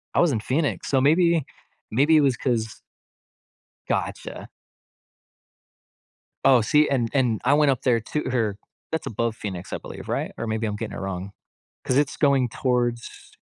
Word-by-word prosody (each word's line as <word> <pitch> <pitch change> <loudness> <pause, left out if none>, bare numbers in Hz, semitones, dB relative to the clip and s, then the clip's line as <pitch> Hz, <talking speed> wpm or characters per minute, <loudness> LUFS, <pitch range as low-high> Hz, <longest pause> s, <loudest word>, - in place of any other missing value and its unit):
I - - +4
was 175 -3 +4
in 115 - 0
Phoenix. 140 +7 -1
So 135 - +3
maybe 165 +1 +3 0.5
maybe 145 +8 +4
it - - +5
was 135 -3 +3
'cause 115 -4 -2 1.1
Gotcha. - - -3 1.9
Oh, 130 -3 +6
see, 150 +7 +3
and 120 -4 +1
and 125 -6 +2
I 135 - +5
went 145 -1 +4
up 130 -1 -2
there 120 -3 +3
to 150 +5 -3
her 110 -5 0 0.3
that's 160 - -2
above 115 +1 -2
Phoenix, 95 -5 -6
I - - -1
believe, - - -10
right? - - -2
Or 115 - -4
maybe 110 +1 -1
I'm 105 - -3
getting 110 +1 -5
it - - -5
wrong. 95 0 -5 0.5
'Cause 130 - 0
it's 145 0 +1
going 140 -4 +3
towards 120 -1 -2
125 Hz, 165 wpm, -24 LUFS, 110-145 Hz, 1.9 s, Oh